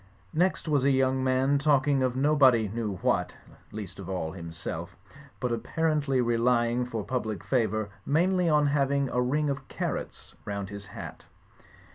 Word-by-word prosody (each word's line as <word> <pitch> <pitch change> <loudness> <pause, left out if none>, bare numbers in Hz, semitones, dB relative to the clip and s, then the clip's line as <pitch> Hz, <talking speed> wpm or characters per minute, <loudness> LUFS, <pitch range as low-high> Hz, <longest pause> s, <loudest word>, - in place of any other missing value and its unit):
Next 180 +1 +1
was 145 -4 +2
a 140 - +4
young 130 -1 +2
man 130 +2 +2
talking 140 -1 +3
of 130 -1 +1
nobody 130 -5 +4
knew 105 -1 -3
what - - +1 0.4
(least 100 -3 -7
of 95 -1 -7
all 90 -4 -2
himself), 85 -2 -6 0.4
but 125 - -1
apparently 145 +1 0
relying 120 +1 +2
for 115 -4 -4
pub 125 -2 -2
lic 105 -5 -4
favour 110 -5 0
mainly 180 +3 +2
on 150 -1 +4
having 140 -1 +1
a 125 - 0
ring 145 +5 +1
of 135 -1 -3
carrots - - -5
round 100 -1 -4
his 100 0 -8
hat. - - -9
130 Hz, 155 wpm, -28 LUFS, 110-140 Hz, 0.4 s, a